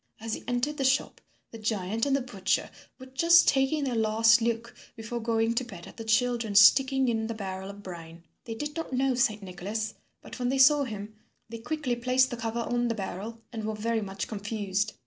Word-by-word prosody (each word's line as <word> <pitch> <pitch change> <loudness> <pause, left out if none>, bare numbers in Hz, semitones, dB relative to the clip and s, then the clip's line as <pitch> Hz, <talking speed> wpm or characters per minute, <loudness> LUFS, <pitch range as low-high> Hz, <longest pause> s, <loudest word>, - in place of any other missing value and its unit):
As 225 0 -4
he - - -5
entered 245 +5 -1
the 275 - -1
shop, 265 +1 +1 0.3
the 230 - -9
giant 215 +2 -1
and 275 - +2
the 275 - 0
butcher 205 -7 -1 0.3
were 260 - -11
just 335 +6 +5
taking 275 +2 +2
their 260 -3 -1
last 225 +1 +4
look 230 0 -2 0.2
before 225 +1 -5
going 225 0 +1
to 235 - 0
bed 190 -8 -10
at - - -13
the 225 - -6
children 230 -1 +1
sticking 265 +6 +6
in 225 -2 0
the 230 - -4
barrel 190 -2 -5
of 200 0 -10
brine. 170 -2 -10 0.2
They 225 - -5
did 295 +5 -5
not 330 -3 -4
know 265 +1 +2
Saint 220 -4 +1
Nicholas, 205 +4 -4 0.3
but - - -11
when 245 0 0
they 270 - 0
saw 280 +2 +6
him 210 -2 -7 0.4
they 230 0 -7
quickly 270 0 -2
placed 255 +2 +2
the - - -2
cover 230 +1 -3
on 240 +1 0
the 230 - -1
barrel 215 +3 -6
and 220 -1 -5
were 215 0 -3
very 225 +1 -1
much 195 -1 -5
confused. 205 -1 -2
230 Hz, 210 wpm, -28 LUFS, 210-255 Hz, 0.4 s, sticking